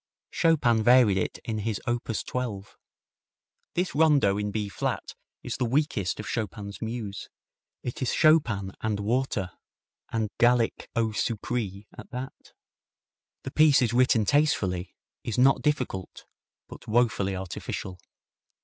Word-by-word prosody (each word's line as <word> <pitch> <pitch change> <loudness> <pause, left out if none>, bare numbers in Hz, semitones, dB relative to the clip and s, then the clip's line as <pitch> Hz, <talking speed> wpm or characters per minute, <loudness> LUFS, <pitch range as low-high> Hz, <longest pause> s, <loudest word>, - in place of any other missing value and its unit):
Chopin 140 -9 +3
varied 120 -4 +5
it - - -2
in 110 -2 -2
his 105 0 -2
op. 120 0 -1
12. 110 -3 -4 1.0
This 180 +1 0
rondo 145 -10 +4
in 105 0 -2
B 105 0 -2
flat 100 - -3 0.3
is - - -4
the 125 - 0
weakest 120 - 0
of 110 - -6
Chopin's 100 -2 -4
muse. 110 -3 -5 0.5
It 125 - -5
is 130 - 0
Chopin 120 - +3
and 110 -2 -1
water, 105 -3 -1 0.6
and 110 -2 -1
Gallic 120 -1 +2
eau 115 -1 +1
sucree 105 -2 -3
at - - -11
that. 130 +1 -8 0.9
The 135 - -6
piece 150 -3 +5
is 115 -1 0
written 120 -3 +4
tastefully, 100 - +1 0.3
is 115 - -3
not 135 +2 +5
difficult, 125 - -2 0.4
but - - -12
woefully 110 -4 +1
artificial. 95 0 -5
115 Hz, 130 wpm, -27 LUFS, 100-130 Hz, 1.0 s, varied